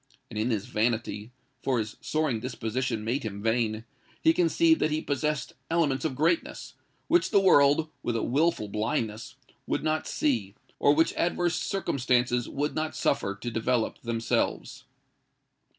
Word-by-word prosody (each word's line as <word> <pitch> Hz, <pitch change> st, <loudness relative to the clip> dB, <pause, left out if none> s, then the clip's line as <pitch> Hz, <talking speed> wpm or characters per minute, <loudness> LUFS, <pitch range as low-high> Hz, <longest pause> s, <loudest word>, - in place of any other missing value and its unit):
And 110 Hz, -, -4 dB
in 110 Hz, +3 st, 0 dB
his 105 Hz, -4 st, -1 dB
vanity—for 120 Hz, +3 st, -2 dB
his 110 Hz, -1 st, -3 dB
soaring 155 Hz, -7 st, 0 dB
disposition 115 Hz, -1 st, -3 dB
made 120 Hz, +6 st, -1 dB
him 100 Hz, -3 st, -6 dB
vain—he 115 Hz, -, -1 dB
conceived 330 Hz, -2 st, +3 dB
that -, -, +3 dB
he 155 Hz, 0 st, 0 dB
possessed 150 Hz, 0 st, -2 dB, 0.2 s
elements 150 Hz, -6 st, +1 dB
of 145 Hz, -5 st, -1 dB
greatness, 165 Hz, +5 st, 0 dB, 0.3 s
which 350 Hz, -, +3 dB
the 200 Hz, -, +5 dB
world, 155 Hz, -4 st, +4 dB
with 120 Hz, -, -2 dB
a 115 Hz, -, 0 dB
wilful 145 Hz, -4 st, +1 dB
blindness, 110 Hz, +4 st, -2 dB, 0.3 s
would -, -, -1 dB
not 155 Hz, 0 st, 0 dB
see; 110 Hz, -9 st, -1 dB, 0.2 s
or 145 Hz, -, +4 dB
which 160 Hz, +2 st, +3 dB
adverse 175 Hz, 0 st, 0 dB
circumstances 125 Hz, -9 st, 0 dB
would 145 Hz, +2 st, -2 dB
not 155 Hz, 0 st, -2 dB
suffer 100 Hz, -7 st, 0 dB
to 120 Hz, +4 st, -5 dB
develop 115 Hz, +1 st, -1 dB
themselves. 115 Hz, -1 st, -2 dB
125 Hz, 140 wpm, -27 LUFS, 115-155 Hz, 0.3 s, the